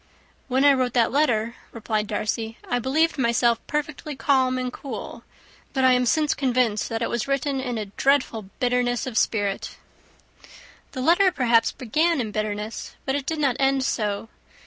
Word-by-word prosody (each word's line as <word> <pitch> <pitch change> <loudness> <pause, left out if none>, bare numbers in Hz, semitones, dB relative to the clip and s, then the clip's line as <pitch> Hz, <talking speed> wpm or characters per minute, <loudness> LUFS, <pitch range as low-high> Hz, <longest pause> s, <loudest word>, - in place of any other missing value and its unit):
"When 265 +1 +2
I 285 - +7
wrote 255 -2 0
that 235 -3 +3
letter," 235 -5 +1 0.2
replied 215 -2 -2
Darcy, 220 +1 -3
"I 245 - 0
believed 305 +5 +1
myself 235 -1 +2
perfectly 300 0 -3
calm 260 -2 +2
and 250 -1 -3
cool; 275 - -7 0.5
but 265 -2 0
I 260 - +6
am 250 0 +3
since 305 +3 +2
convinced 250 -5 0
that 225 0 -2
it - - -1
was 235 0 -2
written 275 0 0
in 250 -3 -3
a 215 - -3
dreadful 225 -1 0
bitterness 245 -1 +1
of 255 -4 -6
spirit." 205 -3 0 1.2
"The 255 - -4
letter, 350 +7 +4
perhaps, 235 -7 +3
began 310 +6 0
in 220 -4 -2
bitterness, 215 +1 -4
but 265 - 0
it 280 -1 -3
did 320 - -1
not 275 -5 +1
end 270 0 +2
so. 210 -4 -1
250 Hz, 170 wpm, -24 LUFS, 225-275 Hz, 1.2 s, I